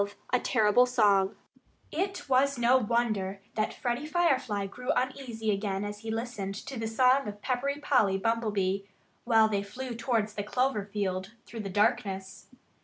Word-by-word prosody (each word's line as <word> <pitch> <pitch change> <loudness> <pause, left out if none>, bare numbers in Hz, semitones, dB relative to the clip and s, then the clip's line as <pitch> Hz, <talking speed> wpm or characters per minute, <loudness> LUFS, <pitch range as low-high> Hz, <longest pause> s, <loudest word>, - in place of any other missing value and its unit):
XII 200 0 -7 0.2
A 250 - +5
TERRIBLE 235 +1 +4
SONG 205 -6 +3 0.6
It 385 +2 -3
was 270 +1 +3
no 240 +2 +5
wonder 215 -5 0
that 215 0 0
Freddie 245 +4 -3
Firefly 270 - +1
grew 250 +6 -8
uneasy 250 -4 -2
again 200 0 -2
as 205 0 -6
he 225 +1 -7
listened 220 -4 -3
to 250 +4 -7
the 225 - -2
song 255 +4 +3
of 205 0 -8
Peppery 275 +2 -1
Polly 215 -10 +3
Bumblebee, 205 -3 0 0.5
while 225 -2 +5
they 205 -2 0
flew 245 +5 -6
towards 230 -2 -1
the 210 - -3
clover 250 -1 0
field 190 0 -2
through 230 - -8
the 200 -2 -4
darkness. 195 -2 -1
225 Hz, 160 wpm, -29 LUFS, 205-250 Hz, 0.6 s, A